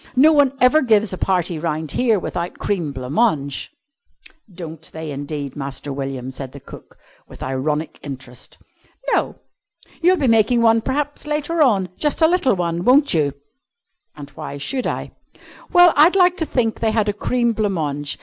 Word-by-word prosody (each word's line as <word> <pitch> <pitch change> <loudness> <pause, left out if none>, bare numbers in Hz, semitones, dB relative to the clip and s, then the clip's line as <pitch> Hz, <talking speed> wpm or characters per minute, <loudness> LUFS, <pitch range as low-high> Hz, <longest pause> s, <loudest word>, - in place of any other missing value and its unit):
No 300 +5 +6
one 285 -3 +4
ever 260 +5 +5
gives 220 -5 +2
a - - -4
party 180 -3 0
round 155 -2 -3
here 230 -4 +2
without 175 -1 -4
cream 175 -8 -2
blanc 130 0 -6
mange!" 150 - 0 0.8
"Don't 165 -3 -9
they 160 -1 -6
indeed, 145 0 -5
Master 140 0 -5
William," 135 -2 -5
said 135 +1 -8
cook, - - -13 0.3
with - - -11
ironic 150 +4 -2
interest. 130 -3 -10 0.6
"No. - - 0 0.7
You'll 365 +2 +4
be 285 - 0
making 230 +1 +3
one, 225 0 +4
p'raps, 290 +4 -3
later 300 +2 -1
on 205 -10 +3
just 295 -1 -1
a - - +7
little 335 - +2
one, 170 -1 -2
won't 275 +6 +4
you?" 145 -4 +1 0.8
"And 145 -1 -10
why 140 - -7
should 250 - -3
I?" - - -4 0.6
"Well, 355 -2 +7
I'd 315 +6 +5
like 360 -2 +4
to 320 - -2
think 225 -4 -1
they 225 - +1
had 215 -1 +1
a 205 - +1
cream 235 +3 0
blanc 210 -2 0
mange. 145 -4 -3
195 Hz, 170 wpm, -20 LUFS, -, 0.8 s, a